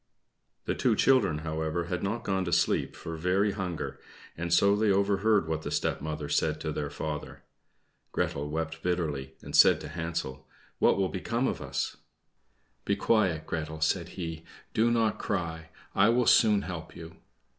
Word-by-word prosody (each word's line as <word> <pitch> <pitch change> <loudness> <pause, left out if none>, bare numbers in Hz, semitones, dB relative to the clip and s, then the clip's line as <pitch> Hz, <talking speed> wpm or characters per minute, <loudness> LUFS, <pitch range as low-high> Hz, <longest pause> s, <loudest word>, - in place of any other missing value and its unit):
The - - 0
two - - +2
children, 130 - +3
however, 80 +2 -1
had 90 +1 -3
not 105 +4 -2
gone 95 -1 0
to 85 - -3
sleep - - +1
for 80 - -6
very 95 +5 +2
hunger, 95 -5 -4 0.4
and 85 +1 -4
so 100 +3 +5
they 105 0 +2
overheard 100 -1 +2
what 80 -1 -2
the - - -5
stepmother 75 0 -2
said 80 +1 +1
to 80 - -2
their 75 -1 -3
father. 75 0 -5 0.7
Gretel 75 +1 -1
wept 80 +1 -3
bitterly, 80 -7 -2
and - - -5
said - - +7
to 75 - -7
Hansel, 80 -4 -4 0.3
"What - - +4
will 95 -1 +1
become 115 +7 -1
of - - -3
us?" - - -3 0.9
"Be - - +1
quiet, 95 -8 +1
Gretel," 80 -1 -4
said 85 +2 0
he. 80 -3 -5 0.3
"Do 115 +2 +3
not 115 -2 +1
cry 80 -4 -3 0.2
I 100 +3 +5
will 120 +1 +3
soon 105 -4 +5
help 85 -3 -7
you." 80 0 -10
85 Hz, 165 wpm, -29 LUFS, 80-100 Hz, 0.9 s, said